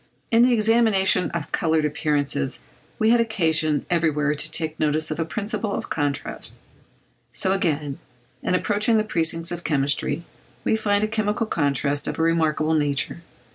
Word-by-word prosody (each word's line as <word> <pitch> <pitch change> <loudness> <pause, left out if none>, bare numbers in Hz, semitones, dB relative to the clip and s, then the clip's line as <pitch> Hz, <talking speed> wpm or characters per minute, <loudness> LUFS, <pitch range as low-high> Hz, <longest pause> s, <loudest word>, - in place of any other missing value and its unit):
In 230 0 +5
the 250 +1 +5
examination 215 -4 +3
of 170 -3 -5
coloured 160 -2 +1
appearances 145 -4 -1 0.4
we 220 +1 +3
had 240 - +4
occasion 160 -9 +1
everywhere 155 -4 +1
to 150 - +1
take 160 -1 -2
notice 155 +1 0
of 155 - -4
a 165 - 0
principle 210 +3 -3
of - - -6
contrast: 145 -3 -1 0.7
so 190 +9 +1
again, 155 -7 -1 0.4
in - - 0
approaching 210 +4 +2
the 215 - +2
precincts 165 -4 0
of 175 0 -5
chemistry, 145 +2 0 0.4
we - - +2
find 205 -1 +1
a - - +2
chemical 215 +1 -1
contrast 145 -5 0
of - - -3
a - - -1
remarkable 160 -1 +1
nature. 145 +1 0
165 Hz, 155 wpm, -23 LUFS, 150-210 Hz, 0.7 s, In